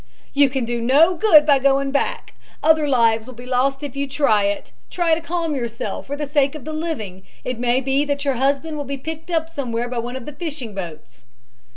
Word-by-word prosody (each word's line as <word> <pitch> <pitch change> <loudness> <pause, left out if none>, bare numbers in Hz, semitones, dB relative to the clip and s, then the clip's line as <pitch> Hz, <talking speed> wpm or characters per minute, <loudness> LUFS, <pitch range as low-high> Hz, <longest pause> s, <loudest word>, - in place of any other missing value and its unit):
"You 280 -1 +5
can 260 -2 -2
do 235 0 -2
no 290 +9 +5
good 325 -5 +6
by 285 -3 +5
going 275 0 +2
back 280 - -2 0.3
other 315 -1 +4
lives 230 -4 +3
will 255 - -10
be 245 +2 -10
lost 265 +2 0
if 280 -3 -6
you 280 0 -2
try 270 -8 +2
to 200 - +2
do - - -9
it. - - -17 0.2
Try 345 -2 +1
to 325 - +1
calm 335 -1 -2
yourself 235 -3 -4
for 285 - -3
the 295 0 -3
sake 285 0 +1
of 300 - -9
the 310 - -5
living. 275 - -4 0.2
It 250 -2 -4
may 245 +1 +2
be 270 +2 +1
that 285 0 -2
your 275 - +2
husband 280 +5 0
will 290 - -3
be 280 0 -4
picked 320 +4 -7
up 325 -2 0
somewhere 245 -7 -3
by 245 -1 -3
one 240 +2 -4
of 260 -2 -6
the 300 - -7
fishing 290 -7 -6
boats." 155 - -8
275 Hz, 235 wpm, -21 LUFS, 240-300 Hz, 0.3 s, good